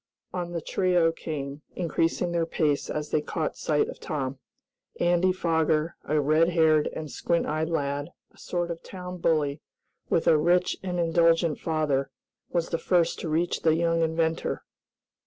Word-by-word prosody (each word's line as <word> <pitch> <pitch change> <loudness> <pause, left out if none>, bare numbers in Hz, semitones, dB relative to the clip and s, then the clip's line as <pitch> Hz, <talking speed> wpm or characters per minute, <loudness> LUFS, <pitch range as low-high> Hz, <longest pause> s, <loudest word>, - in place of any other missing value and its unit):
On 175 -1 -3
the 170 - -2
trio 180 -3 +2
came, 145 -3 -5
increasing 170 0 0
their 170 -1 0
pace 150 -4 0
as 150 0 -3
they 155 - +2
caught 155 +1 -3
sight 150 -2 +1
of - - -8
Tom. 135 -3 -3 0.6
Andy 175 +1 +3
Foger, 160 -2 +1
a 155 0 +1
red 155 +3 +3
haired 160 -3 +4
and 155 -2 -6
squint 170 -1 0
eyed 155 +1 -1
lad, 145 -2 -2 0.2
a - - -25
sort 175 -1 -2
of 165 - -6
town 180 -1 -8
bully, 150 -3 +1 0.5
with 165 - +2
a 155 - +5
rich 175 +3 +3
and 180 -2 -3
indulgent 165 -1 +3
father, 150 -4 0 0.4
was 170 -1 -1
the 165 - -1
first 170 -2 +2
to 165 - -4
reach 165 +3 0
the 160 -1 +4
young 165 0 +1
inventor. 160 0 0
165 Hz, 160 wpm, -27 LUFS, 155-170 Hz, 0.6 s, a